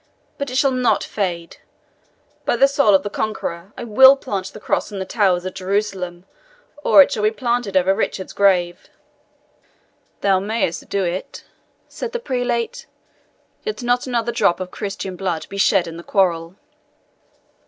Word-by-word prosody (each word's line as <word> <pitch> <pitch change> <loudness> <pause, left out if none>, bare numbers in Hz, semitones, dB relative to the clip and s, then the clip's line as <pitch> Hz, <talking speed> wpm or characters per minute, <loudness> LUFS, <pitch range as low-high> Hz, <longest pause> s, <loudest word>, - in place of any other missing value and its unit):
But 280 -1 -3
it 255 - -6
shall 275 0 +3
NOT 255 -2 +1
fade. 175 -5 -4 0.9
By - - +1
the 270 +3 +5
soul 275 -7 +4
of 190 - +2
the 205 - -3
Conqueror, 195 -4 -4
I - - -6
will 265 +4 +7
plant 200 -8 -4
the - - -11
Cross 210 - -1
on 205 - -6
the 190 - -3
towers 185 -4 +1
of 185 - -4
Jerusalem, 190 -2 -3 0.6
or 290 - +8
it - - -5
shall 210 - -2
be 210 - +4
planted 235 -4 -1
over 185 +1 +3
Richard's 195 -2 -3
grave!" 180 -3 +1 1.3
"Thou 195 -2 +3
mayest 200 -4 -2
do 200 -1 0
it," 180 +1 -4 0.4
said 475 - -6
the 480 - -2
prelate, 245 - -2 0.8
"yet 435 - -4
not 245 +1 +1
another 235 -2 -1
drop 190 -6 +2
of 185 -1 -6
Christian 195 -2 -5
blood 175 -4 -3
be 200 - -6
shed 195 -2 +3
in 165 0 -8
the 170 - -9
quarrel." 170 -3 0
200 Hz, 165 wpm, -20 LUFS, 185-240 Hz, 1.3 s, or